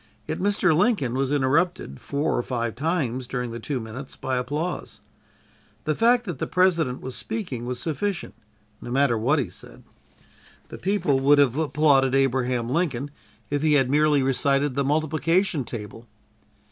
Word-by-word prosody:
Yet -, -, -3 dB
Mr. 190 Hz, -4 st, +2 dB
Lincoln 175 Hz, -, +2 dB
was 135 Hz, +1 st, 0 dB
interrupted 145 Hz, -, 0 dB
four 145 Hz, +2 st, -1 dB
or -, -, +1 dB
five 120 Hz, -2 st, -3 dB
times 130 Hz, -4 st, -2 dB
during 125 Hz, -2 st, -3 dB
the 115 Hz, -, -6 dB
two 130 Hz, +3 st, -3 dB
minutes 115 Hz, +4 st, -8 dB
by 130 Hz, -2 st, -2 dB
applause. 150 Hz, +8 st, -3 dB, 0.8 s
The 155 Hz, -, 0 dB
fact 240 Hz, +5 st, +3 dB
that 175 Hz, -, -5 dB
the -, -, -2 dB
President 170 Hz, -8 st, +1 dB
was 130 Hz, -1 st, -6 dB
speaking 175 Hz, -, -4 dB
was 125 Hz, -1 st, -3 dB
sufficient, 170 Hz, +8 st, -3 dB, 0.5 s
no -, -, -8 dB
matter 130 Hz, -1 st, +2 dB
what 125 Hz, +8 st, +2 dB
he 135 Hz, -7 st, 0 dB
said. -, -, -11 dB, 0.9 s
The -, -, -9 dB
people 185 Hz, -8 st, +1 dB
would 140 Hz, +2 st, +5 dB
have 135 Hz, -4 st, +4 dB
applauded 145 Hz, -3 st, +3 dB
Abraham 130 Hz, -3 st, +1 dB
Lincoln 145 Hz, -2 st, -1 dB, 0.4 s
if 145 Hz, -1 st, 0 dB
he 155 Hz, -1 st, +3 dB
had 135 Hz, -3 st, +3 dB
merely 150 Hz, -1 st, +3 dB
recited 135 Hz, +1 st, +1 dB
the 140 Hz, -, 0 dB
multiplication 155 Hz, +3 st, +1 dB
table! 115 Hz, +1 st, -8 dB
140 Hz, 160 wpm, -24 LUFS, 125-160 Hz, 0.9 s, would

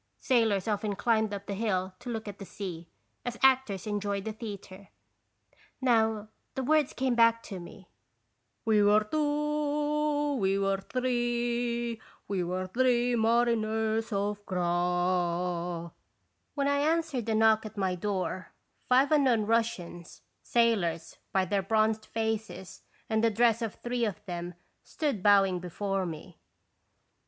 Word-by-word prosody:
Sailors 225 Hz, -7 st, +2 dB
often 210 Hz, -1 st, -1 dB
climbed 220 Hz, 0 st, +1 dB
up 200 Hz, -1 st, -5 dB
the 200 Hz, -, -4 dB
hill 190 Hz, -3 st, -1 dB
to 245 Hz, -, -8 dB
look 225 Hz, -2 st, -4 dB
at 205 Hz, -1 st, -7 dB
the -, -, -6 dB
sea, 175 Hz, -4 st, -7 dB, 0.3 s
as 245 Hz, -1 st, -4 dB
actors 260 Hz, -8 st, +3 dB
enjoy 205 Hz, -1 st, -2 dB
the 215 Hz, +2 st, -5 dB
theatre. 200 Hz, -3 st, -9 dB, 0.9 s
Now, 220 Hz, -4 st, +2 dB, 0.3 s
the 265 Hz, -, -2 dB
words 300 Hz, +1 st, +3 dB
came 260 Hz, -1 st, 0 dB
back 230 Hz, -1 st, +4 dB
to 195 Hz, -3 st, -7 dB
me: 175 Hz, +2 st, -12 dB, 0.8 s
"We 215 Hz, -2 st, +4 dB
were 210 Hz, +1 st, +5 dB
two, 295 Hz, +1 st, 0 dB
we 195 Hz, -3 st, +1 dB
were 195 Hz, 0 st, 0 dB
three, 240 Hz, -1 st, -1 dB, 0.3 s
We 190 Hz, -3 st, -1 dB
were 185 Hz, +2 st, -2 dB
three 245 Hz, +3 st, +2 dB
mariners 225 Hz, -1 st, +1 dB
Of 205 Hz, 0 st, -2 dB
Groix." 175 Hz, -1 st, 0 dB, 0.6 s
When 280 Hz, -1 st, 0 dB
I 285 Hz, 0 st, +2 dB
answered 305 Hz, -6 st, 0 dB
a 220 Hz, -, +2 dB
knock 220 Hz, 0 st, +4 dB
at 215 Hz, -, -14 dB
my 190 Hz, -2 st, 0 dB
door 185 Hz, -1 st, -3 dB, 0.4 s
five 265 Hz, +4 st, +4 dB
unknown 260 Hz, -8 st, +3 dB
Russians, 200 Hz, -7 st, -2 dB, 0.2 s
sailors, 195 Hz, -9 st, +1 dB
by 190 Hz, -1 st, +2 dB
their 195 Hz, +2 st, 0 dB
bronzed 215 Hz, +2 st, +1 dB
faces 220 Hz, -5 st, -4 dB, 0.3 s
and 220 Hz, 0 st, 0 dB
the 230 Hz, -, +5 dB
dress 230 Hz, +1 st, +3 dB
of 225 Hz, -3 st, -3 dB
three 240 Hz, -1 st, -2 dB
of 210 Hz, -1 st, -5 dB
them, 175 Hz, -1 st, -5 dB, 0.3 s
stood 285 Hz, -, -2 dB
bowing 195 Hz, -2 st, +4 dB
before 190 Hz, +2 st, -2 dB
me. 165 Hz, +1 st, -9 dB
220 Hz, 135 wpm, -29 LUFS, 190-240 Hz, 0.9 s, were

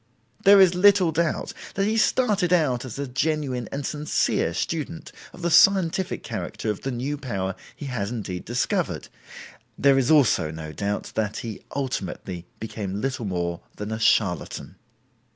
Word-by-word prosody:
There 200 Hz, -1 st, +8 dB
is 185 Hz, -2 st, +7 dB
little 185 Hz, -1 st, +5 dB
doubt 165 Hz, 0 st, -1 dB, 0.2 s
that 195 Hz, -, +1 dB
he 215 Hz, +2 st, +1 dB
started 215 Hz, -5 st, +2 dB
out 135 Hz, -8 st, +2 dB
as 130 Hz, -, -7 dB
a 140 Hz, -, -2 dB
genuine 135 Hz, -3 st, -1 dB
and 140 Hz, 0 st, -4 dB
sincere 150 Hz, -, 0 dB
student 165 Hz, -, -3 dB, 0.2 s
of 180 Hz, -, -12 dB
the 170 Hz, -, +1 dB
scientific 190 Hz, 0 st, +4 dB
character 110 Hz, -, -3 dB
of 105 Hz, -, -6 dB
the 135 Hz, -, -3 dB
new 135 Hz, +4 st, -3 dB
power 95 Hz, -8 st, -3 dB, 0.2 s
he 145 Hz, -, -8 dB
had 115 Hz, -7 st, -2 dB
indeed 100 Hz, -7 st, -5 dB
discovered; 120 Hz, +3 st, -1 dB, 0.7 s
there 140 Hz, -1 st, +5 dB
is 125 Hz, -, +1 dB
also 140 Hz, -, +4 dB
no 80 Hz, 0 st, -7 dB
doubt 100 Hz, +3 st, -3 dB
that 105 Hz, -1 st, -1 dB
he 110 Hz, -2 st, -6 dB
ultimately 95 Hz, -9 st, -4 dB
became 100 Hz, -3 st, -4 dB
little 130 Hz, -1 st, -2 dB
more 85 Hz, -3 st, -2 dB
than 105 Hz, +1 st, -5 dB
a 110 Hz, -, -3 dB
charlatan. 95 Hz, -3 st, +1 dB
130 Hz, 155 wpm, -25 LUFS, 105-165 Hz, 0.7 s, There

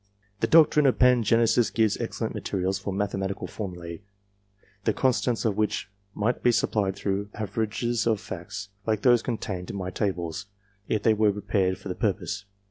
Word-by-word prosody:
The 115 Hz, -, +1 dB
doctrine 150 Hz, +1 st, +6 dB
of 130 Hz, -, +2 dB
Pangenesis 120 Hz, -2 st, +4 dB
gives 110 Hz, -2 st, +2 dB
excellent -, -, -3 dB
materials 95 Hz, 0 st, -2 dB
for 100 Hz, +1 st, -4 dB
mathematical 95 Hz, 0 st, -2 dB
formula, 85 Hz, -5 st, -6 dB, 0.9 s
the -, -, +2 dB
constants 125 Hz, -2 st, +1 dB
of 105 Hz, -3 st, +1 dB
which 105 Hz, -2 st, -1 dB, 0.2 s
might 110 Hz, +4 st, 0 dB
be 120 Hz, -, +4 dB
supplied 100 Hz, -4 st, +1 dB
through 100 Hz, +1 st, -2 dB
averages 110 Hz, +2 st, -1 dB
of 110 Hz, -3 st, +2 dB
facts, 100 Hz, +4 st, -7 dB, 0.2 s
like 110 Hz, -2 st, 0 dB
those 120 Hz, -2 st, +5 dB
contained 95 Hz, -7 st, -4 dB
in -, -, -5 dB
my 95 Hz, -1 st, -3 dB
tables, 90 Hz, -3 st, -2 dB, 0.4 s
if 110 Hz, -, 0 dB
they 110 Hz, -, +5 dB
were 105 Hz, -1 st, +3 dB
prepared 95 Hz, -2 st, 0 dB
for 100 Hz, -, -9 dB
the 90 Hz, -, -2 dB
purpose. 100 Hz, 0 st, -2 dB
105 Hz, 160 wpm, -26 LUFS, 95-115 Hz, 0.9 s, doctrine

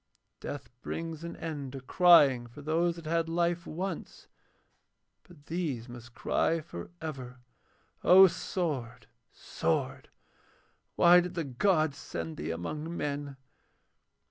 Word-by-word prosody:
Death 145 Hz, -1 st, -7 dB
brings 165 Hz, -1 st, -5 dB
an 170 Hz, -, -6 dB
end 145 Hz, -5 st, -5 dB
to 135 Hz, -, -5 dB
crying 135 Hz, -4 st, +5 dB
for 130 Hz, +5 st, -12 dB
those 165 Hz, +3 st, +1 dB
that 170 Hz, -2 st, -11 dB
had 165 Hz, +1 st, 0 dB
life 170 Hz, 0 st, 0 dB
once, 185 Hz, +5 st, -5 dB, 1.0 s
but 165 Hz, -6 st, -19 dB
these 150 Hz, -9 st, -3 dB
must 120 Hz, -1 st, -11 dB
cry 165 Hz, +1 st, +1 dB
for 85 Hz, -, -8 dB
ever. 130 Hz, -6 st, -7 dB, 0.7 s
O 190 Hz, +2 st, +9 dB
sword! 130 Hz, -, -2 dB, 0.3 s
sword! -, -, -2 dB, 0.9 s
why 175 Hz, +1 st, +7 dB
did 180 Hz, 0 st, -3 dB
the 165 Hz, -, -1 dB
gods 155 Hz, +2 st, +1 dB
send 80 Hz, -1 st, -6 dB
thee 75 Hz, +2 st, -4 dB
among 150 Hz, -, -4 dB
men?' 145 Hz, -1 st, -4 dB
155 Hz, 120 wpm, -30 LUFS, 130-170 Hz, 1.0 s, O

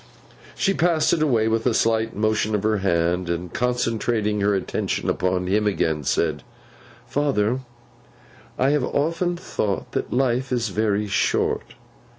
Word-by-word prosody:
She 195 Hz, -, +1 dB
passed 170 Hz, -3 st, +2 dB
it 160 Hz, -, +1 dB
away 120 Hz, -8 st, +2 dB
with 115 Hz, +2 st, +1 dB
a 120 Hz, -, +2 dB
slight 115 Hz, 0 st, +1 dB
motion 110 Hz, 0 st, +1 dB
of 105 Hz, -, -1 dB
her 110 Hz, 0 st, +2 dB
hand, 85 Hz, -1 st, 0 dB
and 85 Hz, +1 st, -3 dB
concentrating 115 Hz, -3 st, 0 dB
her 100 Hz, 0 st, +2 dB
attention 95 Hz, -, -1 dB
upon 90 Hz, 0 st, 0 dB
him 105 Hz, +3 st, +1 dB
again, 80 Hz, -6 st, 0 dB
said, 75 Hz, -1 st, 0 dB, 0.6 s
'Father, 130 Hz, -5 st, 0 dB, 1.0 s
I 135 Hz, +2 st, +3 dB
have 150 Hz, -3 st, +1 dB
often 165 Hz, +6 st, 0 dB
thought 105 Hz, -, -3 dB
that -, -, -3 dB
life 130 Hz, 0 st, 0 dB
is 120 Hz, -3 st, 0 dB
very 105 Hz, 0 st, 0 dB
short. 100 Hz, -, 0 dB
110 Hz, 145 wpm, -23 LUFS, 100-125 Hz, 1.0 s, I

